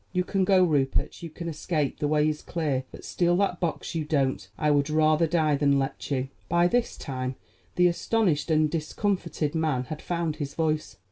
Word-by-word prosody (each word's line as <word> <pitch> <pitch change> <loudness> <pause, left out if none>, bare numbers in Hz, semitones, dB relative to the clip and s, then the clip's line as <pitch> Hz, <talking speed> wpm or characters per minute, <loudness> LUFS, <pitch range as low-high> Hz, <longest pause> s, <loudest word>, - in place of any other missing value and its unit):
You 180 -1 +1
can 190 0 0
go, 185 -1 +5
Rupert; 145 -6 0
you 170 - -6
can 170 +2 -7
escape; 155 -2 -2
the 150 - 0
way 150 0 +3
is 155 -1 -2
clear. 145 -6 -2
But - - -11
steal 175 0 +1
that 195 -2 0
box 170 -3 -2
you 165 -2 -1
don't; 135 - 0
I 150 - +2
would 145 0 +2
rather 155 +1 +3
die 155 -3 +2
than 140 0 +3
let 135 0 -3
you." 135 -2 -1 0.2
By 170 +1 +3
this 240 +5 0
time 130 -2 -4 0.4
the 180 - +4
astonished 175 -2 +1
and 155 -1 +4
discomfited 165 -1 -2
man 155 -6 0
had 150 +4 -7
found 170 -3 -2
his 145 -2 -5
voice. 155 -1 -1
155 Hz, 195 wpm, -26 LUFS, 145-170 Hz, 0.4 s, go